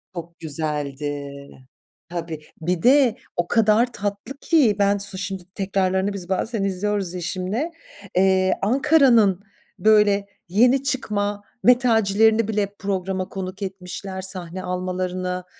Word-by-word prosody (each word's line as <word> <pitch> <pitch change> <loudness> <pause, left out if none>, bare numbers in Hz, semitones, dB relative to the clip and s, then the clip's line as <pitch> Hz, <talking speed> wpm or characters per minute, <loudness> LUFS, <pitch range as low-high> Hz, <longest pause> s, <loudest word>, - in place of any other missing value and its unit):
Çok 170 0 -8
güzeldi. 145 -2 -2 0.8
Tabii. 165 -3 -5 0.2
Bir 170 +1 -1
de 255 -3 +5 0.2
o 175 - -1
kadar 225 +3 +3
tatlı 205 +6 -5
ki 285 - +3
ben 200 0 +3
su 200 -1 0
şimdi 195 -1 -5
tekrarlarını 190 0 0
biz 185 -2 -7
bazen 205 +2 -1
izliyoruz 195 -1 -1
eşimle. 185 - -3 0.4
Eee, 190 0 +3
Ankara'nın 240 - +4 0.4
böyle 210 -2 +4 0.2
yeni 250 +7 +4
çıkma 205 -7 -2 0.2
metalcilerini 225 -2 +4
bile 205 -2 -1
programa 190 -1 -2
konuk 190 +1 -6
etmişler, 190 0 -6
sahne 185 -1 -5
almalarına 180 0 -3
195 Hz, 110 wpm, -22 LUFS, 180-215 Hz, 0.8 s, de